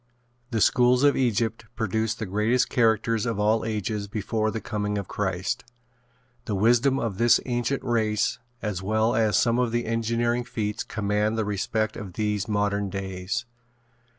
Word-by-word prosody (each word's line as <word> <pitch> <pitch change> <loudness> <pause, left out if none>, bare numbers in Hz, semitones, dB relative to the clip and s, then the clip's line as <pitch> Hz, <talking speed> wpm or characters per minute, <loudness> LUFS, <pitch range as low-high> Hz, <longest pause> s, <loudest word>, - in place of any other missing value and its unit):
The 115 -4 -1
schools 125 +4 +4
of 145 -1 +5
Egypt 115 -2 0
produced 110 +1 -1
the 110 - -3
greatest 105 +6 +1
characters 115 0 +2
of 115 -3 -2
all 105 +2 +2
ages 105 -1 -2
before 110 +1 -1
the 110 - -3
coming 105 -1 -2
of 100 -3 -4
Christ. 95 -2 -2 0.8
The 110 -5 -2
wisdom 120 +6 +3
of 110 -7 -3
this 120 0 +5
ancient 120 +2 -1
race 110 -3 0 0.2
as 105 -4 -2
well 110 +3 +1
as 110 -4 +3
some 120 +1 +2
of 125 -2 +1
the 120 0 -1
engineering 115 +1 0
feats 105 -3 -3
command 105 +1 -1
the 110 - 0
respect 110 +2 -1
of 100 -6 -7
these 105 0 -1
modern 105 -1 0
days. 95 +3 -4
110 Hz, 155 wpm, -25 LUFS, 105-115 Hz, 0.8 s, of